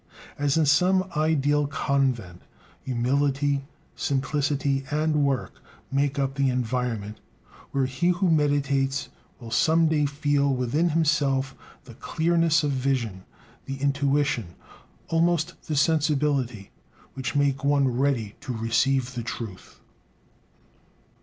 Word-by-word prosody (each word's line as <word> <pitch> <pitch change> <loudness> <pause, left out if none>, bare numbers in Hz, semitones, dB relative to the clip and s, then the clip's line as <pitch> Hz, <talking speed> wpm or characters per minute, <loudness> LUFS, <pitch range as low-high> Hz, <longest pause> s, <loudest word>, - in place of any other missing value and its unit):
As 145 +1 +1
in 160 - +3
some 180 +6 +3
ideal 150 -2 +2
convent, 130 -10 -1 0.4
humility, 140 +2 0 0.3
simplicity, 140 0 0
and 150 0 +1
work 135 -2 -2 0.3
make 140 +1 0
up 135 -1 0
the 140 -1 +1
environment 120 -4 -2 0.5
where 135 -1 0
he 130 +6 -1
who 180 0 +2
meditates 140 -2 +1 0.3
will 115 -2 -10
some 160 +8 +3
day 150 -2 +2
feel 140 0 +1
within 130 +7 +1
himself 145 -4 +1 0.3
the 125 -4 -13
clearness 165 +4 +1
of 145 - 0
vision, 125 -8 -2 0.4
the 135 0 -5
intuition, 140 - 0 0.5
almost 170 +1 +1
the 155 - -1
sensibility, 140 - +1 0.4
which 130 0 -4
make 140 -1 +1
one 140 -1 +3
ready 125 -4 0
to 135 -3 -5
receive 125 +3 +1
the 120 - -4
truth. 110 -4 -8
140 Hz, 115 wpm, -25 LUFS, 130-150 Hz, 0.5 s, in